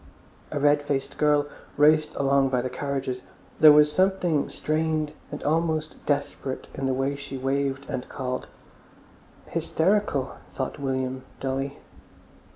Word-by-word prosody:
A 145 - -2
red 145 +1 +4
faced 140 -2 -3
girl 150 -1 +4 0.3
raced 155 +1 +4
along 135 -1 +3
by 125 -2 +1
the 130 - -3
carriages, 135 -1 -3 0.4
there 155 -1 +10
was 150 0 +6
something 185 -4 +2
strained 155 -1 -1 0.2
and 145 - -6
almost 160 0 0
desperate 140 -2 -2
in 135 - -2
the 130 - +1
way 135 +2 0
she 140 -1 -7
waved 135 +1 -1
and 130 -3 -4
called. 130 -1 -4 1.0
"Hysterical!" 160 -7 0
thought 130 - -4
William 130 -1 -2 0.2
dully. 135 +1 -2
140 Hz, 130 wpm, -26 LUFS, 135-150 Hz, 1.0 s, there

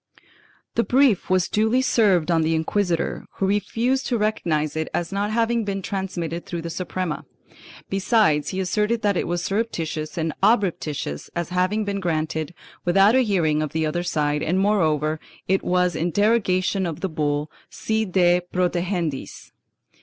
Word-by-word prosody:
The 230 - +2
brief 255 -6 +3
was 185 -1 +2
duly 220 +5 +2
served 190 -9 +3
on 165 -1 +3
the 160 +1 +1
inquisitor, 170 +1 -1
who 195 - 0
refused 225 +6 0
to 240 - +1
recognize 170 -9 0
it 160 0 -2
as 170 +1 -2
not 200 +1 -1
having 230 +1 +1
been 195 -2 -3
transmitted 175 -4 -4
through 170 -2 -4
the 170 - -4
Suprema; 180 -1 -3 0.6
besides 195 - +2
he 190 - -3
asserted 210 +4 0
that 205 -2 +2
it - - -1
was 175 0 -1
surreptitious 165 -8 -2
and 160 -1 -1
obreptitious 165 - 0
as 170 0 -2
having 185 +4 0
been 200 -1 -2
granted 160 -2 -2 0.3
without 195 +4 +5
a 260 - +5
hearing 170 -9 +1
of 155 - -3
the 160 0 0
other 155 +3 -1
side 150 -3 0
and 180 +4 0
moreover 155 -7 +1 0.3
it 190 +1 +2
was 180 -2 +1
in 165 +2 0
derogation 195 -2 +1
of 165 0 -5
the 190 - 0
bull 150 -1 -1 0.2
Si 220 0 -1
de 180 -3 +3
protegendis. 175 -4 -2
180 Hz, 160 wpm, -23 LUFS, 160-205 Hz, 0.6 s, without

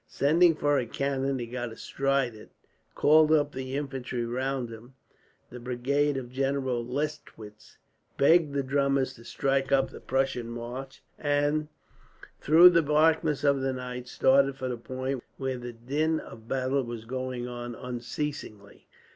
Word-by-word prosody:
Sending 165 +4 +4
for 145 -2 +2
a 120 - -3
cannon, 135 +1 -1
he 120 - -4
got 120 0 -5
astride 135 +1 -1
of 110 - -12
it, - - -15 0.5
called 155 +1 +5
up 145 -2 +3
the 130 0 -5
infantry 130 -4 -3
round 130 0 -2
him 120 +3 -12 0.6
the 125 - -8
brigade 135 +4 0
of 125 -2 -6
General 130 -2 -1
Lestwitz 125 -5 -6 0.4
begged 155 +2 +5
the 140 - +1
drummers 140 0 +1
to 115 - -15
strike 135 +2 -1
up 135 -1 +3
the - - -10
Prussian 130 -3 -1
march 120 +3 -7 0.2
and, 145 +1 +1 0.7
through 170 +4 +8
the 170 -1 +4
blackness 150 -1 +2
of 140 -2 +3
the 135 0 0
night, 125 -1 -6
started 135 +2 +3
for 130 -1 -4
the 125 - -2
point 130 +2 -4
where 130 -2 -3
the 120 0 -7
din 150 +7 -1
of 110 0 -12
battle 135 +1 0
was 120 -2 -7
going 130 0 -4
on 120 -1 -6
unceasingly. 120 -3 -6
135 Hz, 155 wpm, -28 LUFS, 120-145 Hz, 0.7 s, through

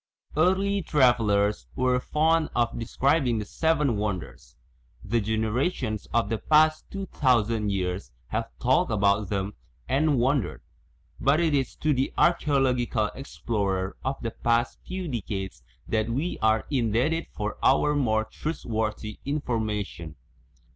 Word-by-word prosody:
Early 190 +5 +2
travellers 105 - +2
were 125 0 +2
fond 155 +4 +1
of 120 -1 0
describing 130 +1 +1
the 105 - -3
Seven 150 -2 +1
Wonders; 100 -4 -4 0.5
the 115 +2 0
generations 110 - -1
of 115 -2 +2
the 110 +1 -2
past 155 0 +3
two 195 0 -5
thousand 115 - +1
years 90 -7 -2 0.2
have - - -2
talked - - +2
about 100 -1 +2
them 100 0 -2 0.3
and 145 0 +2
won 130 +3 +3
dered, 90 - -7 0.6
but 140 +5 +3
it 165 -3 +2
is 135 -2 0
to 155 -1 +1
the 130 0 0
archaeological 130 -9 +2
explorer 100 -8 -2
of 135 +1 -2
the 115 - -2
past 120 +2 0
few 185 -1 -4
decades 95 - -4 0.3
that 110 0 0
we 140 +10 -2
are 110 0 +2
indebted 130 +6 +1
for 105 0 -4
our 150 +2 +4
more 110 -7 +1
trustworthy 110 -8 -4
information. 110 - -3
120 Hz, 130 wpm, -26 LUFS, 105-145 Hz, 0.6 s, our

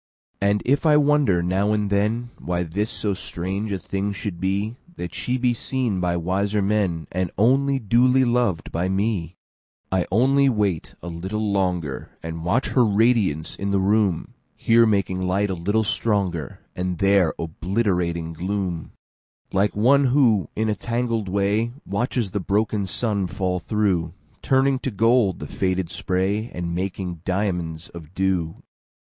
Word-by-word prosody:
And 100 +1 +2
if 140 +3 +2
I 150 -2 +5
wonder 145 -12 +3
now 95 +4 +1
and 105 -1 0
thenWhy 100 -5 -1
this 105 +3 0
so 105 -2 -2
strange 95 +3 -4
a 100 - 0
thing 100 +2 -3
should 100 -3 -5
be—That 100 - -3
she 125 +1 -1
be 125 -1 +2
seen 120 -4 -2
by 90 -1 0
wiser 100 +4 0
menAnd 95 -4 0
only 135 +6 +3
duly 125 +3 +3
lov'd 120 -8 0
by 85 +3 -1
me:I 95 -2 -3
only 135 +6 +4
wait 105 -8 -1
a - - -6
little 95 +5 -3
longer, 90 -7 -2
And 80 0 -5
watch 110 +10 +1
her 125 - +3
radiance 105 -7 +2
in 100 - -3
the 100 - +2
room; 100 -3 +1 0.2
Here 115 0 +4
making 100 -3 0
light 95 +2 0
a - - 0
little 100 +6 0
stronger, 95 - -1
And 90 -1 -2
there 100 -3 +3
obliterating 85 -1 -1
gloom,(Like 95 +2 -4
one 135 +7 +4
who, 125 -7 +3
in 110 +1 0
a 105 - +2
tangled 115 -1 -2
way, 100 +4 +1
Watches 115 0 -1
the 105 - -1
broken 100 +1 0
sun 100 -1 -1
fall 90 -1 -2
through, 90 -4 0 0.3
Turning 135 0 +2
to 135 - -2
gold 115 -2 +3
the 75 - -7
faded 95 +2 -1
spray, 95 +6 -1
And 85 -1 -3
making 90 -2 -4
diamonds 90 -4 -2
of 85 0 -12
dew). 95 -4 -1
100 Hz, 145 wpm, -23 LUFS, 90-110 Hz, 0.3 s, I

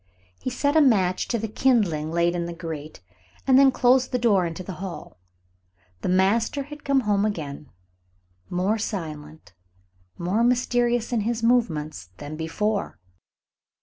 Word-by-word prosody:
He - - -3
set 285 +4 0
a 315 - +6
match 190 -9 +3
to 235 - 0
the 225 0 -3
kindling 205 -11 +1
laid 170 +1 +1
in 170 -1 -2
the 170 - -6
grate, 160 - -7 0.4
and 265 -1 +6
then 275 -1 +6
closed 255 +1 +3
the 250 - +1
door 205 -7 +3
into 165 +2 -6
the 180 -2 -7
hall. 185 - -8 0.8
The - - -2
master 210 +9 +2
had 295 +1 -11
come 275 -1 +2
home 205 -3 +1
again, 150 -9 -4 0.8
more 190 +5 0
silent, 155 - -6 0.6
more 190 +7 0
mysterious 240 -1 +1
in 230 - +1
his 230 +2 -2
movements 160 - 0
than 145 +8 -7
before. 200 +7 -2
205 Hz, 150 wpm, -24 LUFS, 170-240 Hz, 0.8 s, a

